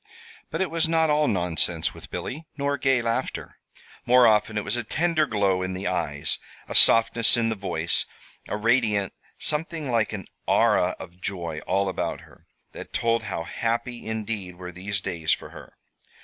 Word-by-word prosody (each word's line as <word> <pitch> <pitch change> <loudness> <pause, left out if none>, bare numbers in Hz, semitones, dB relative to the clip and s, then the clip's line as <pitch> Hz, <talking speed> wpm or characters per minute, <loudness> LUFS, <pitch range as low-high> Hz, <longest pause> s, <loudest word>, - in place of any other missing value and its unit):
But - - -3
it 190 - 0
was 165 -1 +1
not 160 -1 +3
all 150 0 +3
nonsense 90 -5 +1
with - - -12
Billy, 155 +5 -5
nor 140 0 0
gay 135 -2 +2
laughter. 115 0 -3 0.4
More 125 +1 +6
often 110 -1 +3
it 105 - 0
was 105 - -1
a 120 - -1
tender 155 +5 +1
glow 100 -4 +1
in 95 0 -2
the 95 +2 -5
eyes, 75 -4 -1 0.3
a - - -5
softness 115 +1 +5
in 115 -1 +1
the 110 - -1
voice, 85 -4 -1 0.4
a - - -2
radiant 105 -3 +2 0.2
something 155 -2 -1
like 115 -2 +1
an 100 -5 -5 0.2
aura 90 +1 +3
of 90 0 -11
joy 85 -6 -3
all 100 +2 +1
about 95 - -2
her, - - -19 0.2
that - - -10
told 115 -1 +1
how 95 -5 -3
happy 120 +6 -3
indeed 110 -4 -4
were 90 0 -8
these 95 +2 -4
days 80 -4 0
for - - -6
her. - - -13
110 Hz, 175 wpm, -25 LUFS, 95-125 Hz, 0.4 s, More